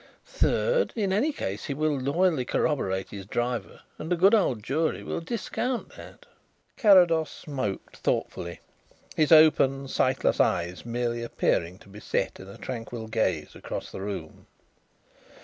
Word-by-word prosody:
Third, -, -, +1 dB
in 200 Hz, -4 st, 0 dB
any 255 Hz, +11 st, +2 dB
case 100 Hz, -, -4 dB
he 140 Hz, -, -3 dB
will 155 Hz, 0 st, +1 dB
loyally 145 Hz, +2 st, +1 dB
corroborate 95 Hz, -8 st, -1 dB
his 100 Hz, -2 st, -8 dB
driver 120 Hz, +2 st, -3 dB, 0.2 s
and 160 Hz, -, -6 dB
the -, -, +4 dB
good 190 Hz, +5 st, +5 dB
old 130 Hz, -, +2 dB
jury 155 Hz, +7 st, -1 dB
will -, -, -3 dB
discount 235 Hz, +6 st, -3 dB
that." -, -, -13 dB, 0.5 s
Carrados 175 Hz, -, +5 dB
smoked 130 Hz, -10 st, -5 dB
thoughtfully, 85 Hz, 0 st, -2 dB, 0.5 s
his 155 Hz, 0 st, +2 dB
open, 140 Hz, -4 st, +5 dB
sightless 130 Hz, 0 st, +1 dB
eyes 90 Hz, +5 st, 0 dB
merely 120 Hz, 0 st, -2 dB
appearing 90 Hz, -6 st, 0 dB
to -, -, -19 dB
be 100 Hz, +1 st, -11 dB
set -, -, -2 dB
in 95 Hz, -, -10 dB
a 100 Hz, -, -11 dB
tranquil 115 Hz, -2 st, -6 dB
gaze 95 Hz, -9 st, -1 dB
across -, -, -6 dB
the -, -, -7 dB
room. 95 Hz, -6 st, -6 dB
130 Hz, 145 wpm, -27 LUFS, 105-165 Hz, 0.5 s, good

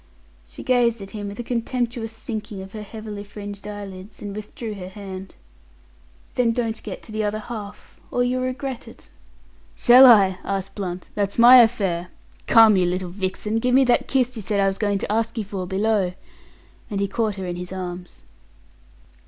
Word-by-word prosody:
She -, -, -10 dB
gazed 240 Hz, -2 st, +2 dB
at 195 Hz, -, -10 dB
him 205 Hz, -2 st, -5 dB
with 200 Hz, 0 st, -7 dB
a 240 Hz, -, -4 dB
contemptuous 235 Hz, -1 st, -2 dB
sinking 215 Hz, -2 st, -6 dB
of 190 Hz, -, -11 dB
her 215 Hz, -, -7 dB
heavily 210 Hz, -1 st, -7 dB
fringed 205 Hz, 0 st, -9 dB
eyelids, 200 Hz, -1 st, -8 dB
and 205 Hz, -1 st, -6 dB
withdrew 215 Hz, +1 st, -6 dB
her 185 Hz, -2 st, -8 dB
hand. 190 Hz, -1 st, -9 dB, 1.0 s
"Then 235 Hz, -2 st, +2 dB
don't 230 Hz, -2 st, -2 dB
get -, -, -7 dB
to -, -, -12 dB
the 215 Hz, 0 st, -2 dB
other 210 Hz, +1 st, -1 dB
half, 215 Hz, -2 st, -9 dB
or 245 Hz, -, +1 dB
you'll 250 Hz, +1 st, 0 dB
regret 255 Hz, 0 st, -4 dB
it." -, -, -15 dB, 0.7 s
"Shall 255 Hz, +2 st, +8 dB
I?" 195 Hz, -6 st, +6 dB
asked 195 Hz, -1 st, -3 dB
Blunt. 180 Hz, -3 st, -6 dB
"That's 200 Hz, -1 st, -2 dB
my 240 Hz, +2 st, +9 dB
affair. 200 Hz, -8 st, +3 dB, 0.4 s
Come, 225 Hz, -3 st, +7 dB
you 180 Hz, -1 st, +3 dB
little 180 Hz, 0 st, -2 dB
vixen, 200 Hz, +3 st, -2 dB
give 250 Hz, +2 st, +2 dB
me 270 Hz, -, +6 dB
that 245 Hz, -2 st, +2 dB
kiss 255 Hz, -1 st, +1 dB
you 220 Hz, -, -5 dB
said 200 Hz, +1 st, -1 dB
I 195 Hz, -, +3 dB
was 195 Hz, 0 st, 0 dB
going 205 Hz, -2 st, +1 dB
to 200 Hz, -, -3 dB
ask 225 Hz, +2 st, -1 dB
you 220 Hz, -, -1 dB
for 190 Hz, -3 st, -5 dB
below," 195 Hz, -1 st, +1 dB, 0.8 s
and 200 Hz, -3 st, -2 dB
he 200 Hz, -, +1 dB
caught 215 Hz, 0 st, -1 dB
her 190 Hz, -2 st, -5 dB
in 175 Hz, -1 st, -4 dB
his 180 Hz, +1 st, -7 dB
arms. 180 Hz, -1 st, -7 dB
210 Hz, 185 wpm, -23 LUFS, 195-230 Hz, 1.0 s, my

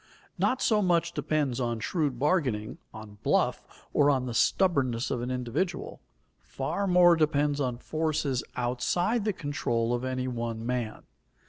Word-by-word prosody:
Not 255 Hz, -, +1 dB
so 215 Hz, -2 st, +3 dB
much 170 Hz, -3 st, +2 dB
depends 150 Hz, -4 st, -1 dB
on 120 Hz, -2 st, -1 dB
shrewd 145 Hz, -1 st, -1 dB
bargaining, 130 Hz, -, 0 dB
on 105 Hz, -1 st, -11 dB
bluff, -, -, -1 dB
or 145 Hz, 0 st, +4 dB
on 130 Hz, -3 st, +2 dB
the 120 Hz, -, -4 dB
stubbornness 130 Hz, -5 st, +2 dB
of 125 Hz, -3 st, -1 dB
an 125 Hz, -, -3 dB
individual. 145 Hz, -, -3 dB, 0.4 s
Far 200 Hz, 0 st, -3 dB
more 175 Hz, -1 st, +6 dB
depends 145 Hz, -2 st, +1 dB
on 125 Hz, -3 st, -1 dB
forces 155 Hz, -2 st, -1 dB
outside 130 Hz, -, 0 dB
the 215 Hz, -, +2 dB
control 120 Hz, -7 st, -1 dB
of 120 Hz, +1 st, -2 dB
any 130 Hz, 0 st, -2 dB
one 115 Hz, -2 st, -4 dB
man. 120 Hz, -3 st, -3 dB
135 Hz, 145 wpm, -28 LUFS, 120-165 Hz, 0.4 s, more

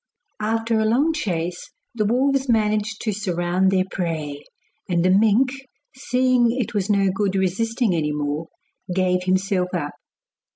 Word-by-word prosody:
After 225 Hz, +1 st, 0 dB
a 220 Hz, -, +1 dB
long 270 Hz, +9 st, +2 dB
chase 175 Hz, -, -3 dB, 0.2 s
the 215 Hz, -3 st, 0 dB
wolves 265 Hz, +4 st, +1 dB
managed 215 Hz, -2 st, +1 dB
to 220 Hz, -, 0 dB
surround 185 Hz, -2 st, 0 dB
their 190 Hz, -1 st, +2 dB
prey, 160 Hz, -6 st, -4 dB, 0.5 s
and 175 Hz, -1 st, +1 dB
the 185 Hz, -, +4 dB
mink, 220 Hz, +6 st, +4 dB, 0.4 s
seeing 255 Hz, -2 st, +2 dB
it 245 Hz, -3 st, -2 dB
was 205 Hz, -1 st, -1 dB
no 195 Hz, -2 st, +3 dB
good 195 Hz, 0 st, -1 dB
resisting 220 Hz, +4 st, 0 dB
any 155 Hz, -3 st, 0 dB
more, 150 Hz, +2 st, -3 dB, 0.4 s
gave 180 Hz, 0 st, +1 dB
himself 185 Hz, -1 st, 0 dB
up. 145 Hz, -4 st, -3 dB
195 Hz, 140 wpm, -22 LUFS, 180-225 Hz, 0.5 s, the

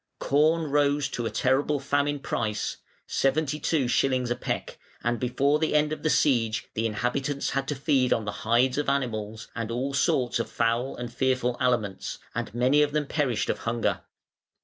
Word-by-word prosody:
Corn 155 Hz, +2 st, +2 dB
rose 145 Hz, 0 st, +2 dB
to 120 Hz, -1 st, -3 dB
a -, -, -2 dB
terrible 140 Hz, +3 st, +1 dB
famine 145 Hz, +1 st, 0 dB
price 110 Hz, -6 st, -2 dB, 0.3 s
(seventy 150 Hz, +2 st, 0 dB
two 150 Hz, -6 st, +1 dB
shillings 125 Hz, 0 st, +1 dB
a -, -, +2 dB
peck), -, -, -4 dB, 0.2 s
and 120 Hz, -1 st, 0 dB
before 140 Hz, +4 st, +1 dB
the 160 Hz, -1 st, 0 dB
end 150 Hz, 0 st, +3 dB
of -, -, -6 dB
the 155 Hz, -, +1 dB
siege 115 Hz, -8 st, +2 dB
the 115 Hz, +1 st, 0 dB
inhabitants 130 Hz, +6 st, -1 dB
had 135 Hz, -1 st, -1 dB
to 145 Hz, -, -1 dB
feed 135 Hz, -2 st, +1 dB
on 110 Hz, -, +1 dB
the 105 Hz, -, -2 dB
hides 125 Hz, +5 st, +2 dB
of 145 Hz, -, 0 dB
animals, 110 Hz, -5 st, -2 dB
and 115 Hz, -1 st, -3 dB
all 130 Hz, +4 st, -2 dB
sorts 125 Hz, -3 st, +1 dB
of 115 Hz, -, -2 dB
foul 115 Hz, +3 st, 0 dB
and 120 Hz, -1 st, -6 dB
fearful 130 Hz, -1 st, +1 dB
aliments, 110 Hz, -7 st, -1 dB, 0.2 s
and -, -, -3 dB
many 130 Hz, +5 st, +4 dB
of 145 Hz, -1 st, +1 dB
them 150 Hz, -1 st, +1 dB
perished 140 Hz, -6 st, 0 dB
of -, -, -1 dB
hunger. 115 Hz, 0 st, -1 dB
130 Hz, 180 wpm, -26 LUFS, 120-145 Hz, 0.3 s, many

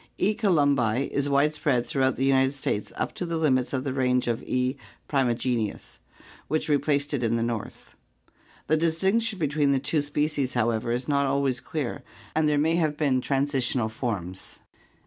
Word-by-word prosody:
E. 210 Hz, -, +2 dB
columbi 140 Hz, -, +2 dB
is 140 Hz, 0 st, 0 dB
widespread 140 Hz, -3 st, +2 dB
throughout 130 Hz, +1 st, +1 dB
the 135 Hz, -, 0 dB
United 135 Hz, 0 st, +3 dB
States 105 Hz, -6 st, -2 dB
up -, -, -3 dB
to -, -, -5 dB
the 170 Hz, -1 st, -2 dB
limits 130 Hz, -6 st, +1 dB
of 130 Hz, -2 st, -1 dB
the 135 Hz, -2 st, -2 dB
range 125 Hz, -1 st, +1 dB
of 115 Hz, -1 st, -1 dB
E. 130 Hz, +1 st, -1 dB, 0.3 s
primigenius, 120 Hz, -5 st, -1 dB, 0.5 s
which 155 Hz, -, -1 dB
replaced 145 Hz, 0 st, +1 dB
it 140 Hz, -, 0 dB
in 115 Hz, -1 st, +1 dB
the 115 Hz, -, 0 dB
north. 115 Hz, -2 st, -5 dB, 0.7 s
The 155 Hz, -, +2 dB
distinction 190 Hz, +7 st, +1 dB
between 150 Hz, -3 st, +1 dB
the 135 Hz, -, +2 dB
two 150 Hz, +3 st, 0 dB
species, 145 Hz, -2 st, -1 dB
however, 115 Hz, -1 st, 0 dB
is 125 Hz, +2 st, -2 dB
not 140 Hz, -1 st, +2 dB
always 135 Hz, -2 st, +1 dB
clear 145 Hz, -1 st, -4 dB, 0.3 s
and 155 Hz, -1 st, +3 dB
there 150 Hz, -, +2 dB
may 160 Hz, +3 st, +2 dB
have 155 Hz, -3 st, 0 dB
been 135 Hz, -4 st, +1 dB
transitional 135 Hz, -4 st, 0 dB
forms. 100 Hz, -6 st, -5 dB
140 Hz, 165 wpm, -26 LUFS, 125-150 Hz, 0.7 s, United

